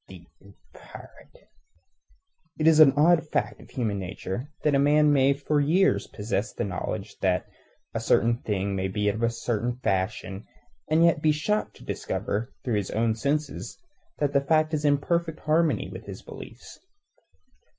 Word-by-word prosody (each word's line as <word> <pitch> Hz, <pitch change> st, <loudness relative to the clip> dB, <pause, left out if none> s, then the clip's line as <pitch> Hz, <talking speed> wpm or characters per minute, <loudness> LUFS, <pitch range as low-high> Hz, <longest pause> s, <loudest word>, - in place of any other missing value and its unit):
Thief -, -, -13 dB, 0.2 s
and -, -, -18 dB, 0.2 s
pirate! -, -, -15 dB, 1.1 s
It 155 Hz, -, -1 dB
is 160 Hz, -1 st, +6 dB
an 145 Hz, -4 st, +8 dB
odd 165 Hz, +2 st, +5 dB
fact 105 Hz, -6 st, -2 dB
of -, -, -16 dB
human 110 Hz, -6 st, -2 dB
nature 95 Hz, +8 st, -5 dB
that 150 Hz, -, +2 dB
a 140 Hz, -, +4 dB
man 150 Hz, +1 st, +4 dB
may 135 Hz, 0 st, +4 dB
for 145 Hz, +1 st, 0 dB
years 175 Hz, +7 st, +2 dB
possess 105 Hz, 0 st, -3 dB
the -, -, -3 dB
knowledge 100 Hz, +1 st, -5 dB
that 90 Hz, -1 st, +1 dB, 0.5 s
a -, -, -1 dB
certain 115 Hz, 0 st, +2 dB
thing 100 Hz, -1 st, -2 dB
must 95 Hz, 0 st, -2 dB
be 105 Hz, 0 st, +1 dB
of 110 Hz, +3 st, -3 dB
a 115 Hz, -, +3 dB
certain 120 Hz, +1 st, -2 dB
fashion, 95 Hz, +1 st, -2 dB, 0.4 s
and 160 Hz, +2 st, +4 dB
yet 165 Hz, -3 st, +3 dB
be 155 Hz, -, +4 dB
shocked 210 Hz, +8 st, -1 dB
to -, -, -15 dB
discover 110 Hz, +5 st, -3 dB
through 120 Hz, -4 st, 0 dB
his 100 Hz, -2 st, -2 dB
own 110 Hz, +1 st, +1 dB
senses 140 Hz, +6 st, -2 dB, 0.4 s
that 145 Hz, -1 st, 0 dB
the 140 Hz, -, +4 dB
fact 155 Hz, +2 st, +2 dB
is 150 Hz, -1 st, -1 dB
in 145 Hz, -1 st, +4 dB
perfect 170 Hz, +2 st, -2 dB
harmony 160 Hz, +1 st, +1 dB
with -, -, -9 dB
his -, -, -8 dB
beliefs. -, -, -11 dB
135 Hz, 170 wpm, -26 LUFS, 105-155 Hz, 1.1 s, an